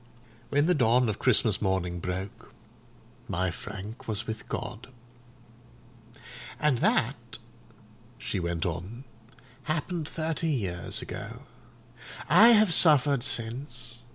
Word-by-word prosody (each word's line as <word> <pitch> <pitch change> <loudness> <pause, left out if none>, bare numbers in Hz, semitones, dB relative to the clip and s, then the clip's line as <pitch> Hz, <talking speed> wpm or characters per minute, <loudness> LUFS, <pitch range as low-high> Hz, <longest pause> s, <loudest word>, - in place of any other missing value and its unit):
When 145 +1 +2
the 180 - +3
dawn 125 -3 +2
of 105 - -4
Christmas 110 -4 +3
morning 95 -3 -1
broke, 90 +3 -7 0.7
my 90 +1 -1
Frank 100 +5 -9
was 110 -1 +2
with 110 -1 -7
God. 115 +3 -6 1.7
"And 150 -5 +1
that," 120 -1 -1 0.8
she 115 -7 -4
went 85 -1 -3
on, 100 +9 -5 0.6
"happened 160 0 -3
thirty 160 0 -2
years 95 - -3
ago. - - -8 0.8
I 225 - +7
have 215 -6 +5
suffered 145 -5 +6
since. 120 0 -3
120 Hz, 105 wpm, -27 LUFS, 100-145 Hz, 1.7 s, I